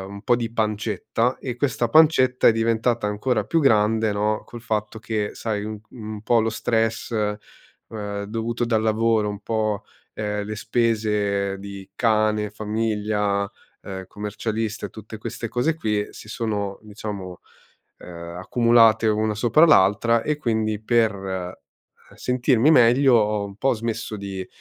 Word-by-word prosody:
un 100 - -9
po' 120 - +3
di 120 -1 -3
pancetta. 110 +2 -1
E 125 -3 -5
questa 125 -2 0
pancetta 130 -3 +5
è - - +8
diventata 115 +1 +1
ancora 105 +2 0
più 165 - +1
grande 110 -5 +3
no, 105 +1 0
col 120 - -10
fatto 110 -1 -2
che 110 -1 -2
sai, 105 -3 -3
un 110 0 -5
un 110 -3 -7
po' 120 +1 +3
lo 110 - 0
stress, 115 0 -1
ehm, 105 -1 -5
dovuto 115 +3 -2
dal 115 -2 +1
lavoro, 110 -1 +2
un 100 -1 -6
po', 110 -1 -1 0.3
ehm, 105 -1 -3
le 110 +1 -5
spese 105 -3 0
di 100 -1 -9
cane, 110 -2 +1
famiglia, 105 -1 -1 0.3
uhm, 95 -1 -7
commercialista 110 +2 -4
e - - -19
tutte 110 +1 -10
queste 115 +2 -5
cose 125 +8 0
qui, 105 -8 -1
si - - -12
sono 105 -3 -3
diciamo, 100 -4 -7 0.6
uhm, 85 0 -9
accumulate 115 +1 +4
una 110 0 +1
sopra 120 +9 +5
l'altra. 115 - +4
E 150 -1 -1
quindi 110 -5 -1
per 95 -6 -1 0.6
sentirmi 125 +2 +2
meglio 125 0 +5
ho 105 -2 +2
un 100 -1 -10
po' 135 +5 +2
smesso 115 -1 -4
di, 95 -2 -6
110 Hz, 145 wpm, -23 LUFS, 105-115 Hz, 0.6 s, è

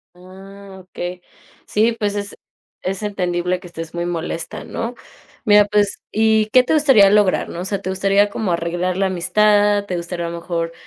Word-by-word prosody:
Ah, 190 +2 -13
okey. 180 0 -7 0.4
Sí, 225 +3 +2
pues, 205 -2 -1
es 205 0 -5 0.5
es 195 +2 -3
entendible 180 -3 -1
que 180 - -12
estés 165 -2 -8
muy 170 0 -3
molesta, 165 -1 -4
¿no? 235 +2 -5 0.5
Mira, 210 -1 +6
pues 205 -1 +1
y, 220 0 +2
¿qué 250 +4 +5
te 255 - 0
gustaría 270 -10 +6
lograr?, 205 -2 +3
¿no? 170 - -7
O - - -5
sea, 195 0 -2
¿te 190 - -3
gustaría 195 +2 +2
como 205 -2 -2
arreglar 175 +2 -1
la 195 - +1
amistad? 205 +2 +2
¿Te 185 - -4
gustaría 170 0 -4
a - - -3
lo 170 - -6
mejor 165 -1 -3
195 Hz, 180 wpm, -19 LUFS, 175-210 Hz, 0.5 s, Mira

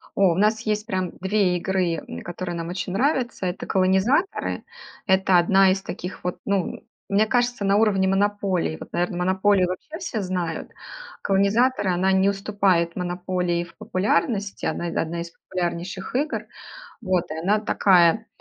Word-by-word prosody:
О, 195 -3 +4
у - - -4
нас 215 +3 +2
есть 215 -1 -1
прям 185 -5 -2
2 190 -2 +2
игры, 180 -2 0
м, - - -7
которые 175 0 -5
нам 165 0 -4
очень 180 0 -4
нравятся- 250 -4 0
это 180 +1 -3
"Колонизаторы". 190 - +1 0.4
Это 190 -1 +4
одна 190 +2 +5
из 195 0 -1
таких 185 0 -7
вот, 180 - -2
ну, 200 -3 -1 0.3
мне 205 +2 +3
кажется, 245 -2 0
на 200 +1 +3
уровне 195 -3 +3
"Монополии". 195 - 0
Вот, - - -10
наверно, 175 0 -1
"Монополию" 190 +1 +2
вообще 305 - -6
все 230 - -3
знают. 180 -3 -3 0.5
"Колонизаторы"- 200 +2 +2
она 190 +2 +2
не 190 +1 +4
уступает 195 -4 +1
"Монополии" 180 -1 -1
в 175 - -16
популярности, 200 +2 -1
она 175 - -2
одна 170 0 -2
из 170 0 -7
популярнейших 180 +4 -5
игр. 300 +4 -1 0.6
Вот 185 -5 -1
и 160 - -4
она 200 +6 +2
такая 195 0 +3
190 Hz, 155 wpm, -23 LUFS, 180-205 Hz, 0.6 s, одна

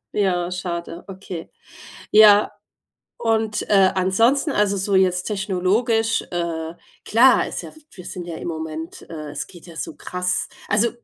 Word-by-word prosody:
Ja, 180 -3 +1
schade. 175 -1 -5
Okay. 190 -3 -8 0.6
Ja. 210 -1 +7 0.7
Und, 220 -2 0
äh, 195 -2 +5
ansonsten 225 - +2
also 205 -4 +2
so 195 +1 0
jetzt 185 -1 +3
technologisch, 215 +3 0
äh 165 -2 -3 0.3
klar, 245 +4 +5
ist - - -5
ja - - -10
w - - -16
wir 180 -3 -12
sind 180 -2 -6
ja 170 - -5
im - - -6
Moment, 160 0 -6
äh 155 -2 -7
es 145 - -5
geht 175 -1 -15
ja 170 - -12
so - - -5
krass. 180 0 -2 0.2
Also, 215 +4 +2
190 Hz, 150 wpm, -22 LUFS, 175-210 Hz, 0.7 s, Ja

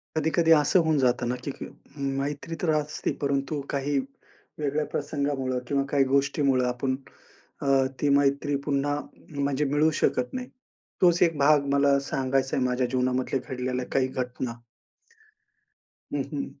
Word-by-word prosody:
कधी-कधी 160 +1 +2
असं 155 +3 +5
होऊन 160 -1 +2
जातं 125 -2 +2
ना 125 - 0
की 140 - -3
क - - -9 0.3
मैत्री 140 +3 -3
तर 175 - 0
असते 150 0 -1
परंतु 140 +1 -1
काही 140 +1 0 0.6
वेगळ्या 150 +1 0
प्रसंगामुळं 140 -3 -1
किंवा 140 +1 +1
काही 140 -1 +3
गोष्टीमुळं 135 -1 +2
आपण 130 +2 -1 0.7
अ, - - -3 0.3
ती 145 - +2
मैत्री 140 +1 +1
पुन्हा 145 0 0 0.4
म्हणजे 140 +1 +1
मिळू 145 +3 +3
शकत 125 -1 +1
नाही. 255 -1 -4 0.5
तोच 175 -2 +4
एक 165 -3 +2
भाग 145 0 +4
मला 140 0 +4
सांगायच 135 0 0
आहे 130 - +1
माझ्या 125 0 +1
जीवनामधल्या 130 +1 0
घडलेल्या 125 0 -2
काही 130 -1 +2
घटना. 125 -2 -4 1.5
हं, 145 - 0
हं. 140 - -2
140 Hz, 140 wpm, -26 LUFS, 130-145 Hz, 1.5 s, असं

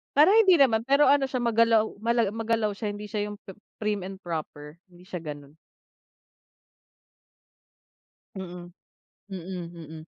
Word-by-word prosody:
Parang 310 +7 +6
hindi 375 -5 +5
naman, 230 -6 +4
pero 280 +1 +5
ano 275 -2 +3
siya, 255 - -2
magalaw 230 -1 +3 0.2
mala 230 -3 +1
magalaw 225 -1 0
siya, 210 +1 -4
hindi 205 +1 -6
siya 210 0 -3
yung 205 - -8
pi 190 - -12 0.3
prim 210 -2 -1
and 190 +1 -7
proper. 155 -2 -6
Hindi 175 0 -18
siya 180 -3 -6
ganun. 145 -2 -9 2.8
Mm. 175 -2 -8 0.6
Mm, 175 -1 -6
mm. 160 -1 -10
205 Hz, 135 wpm, -26 LUFS, 175-230 Hz, 2.8 s, Parang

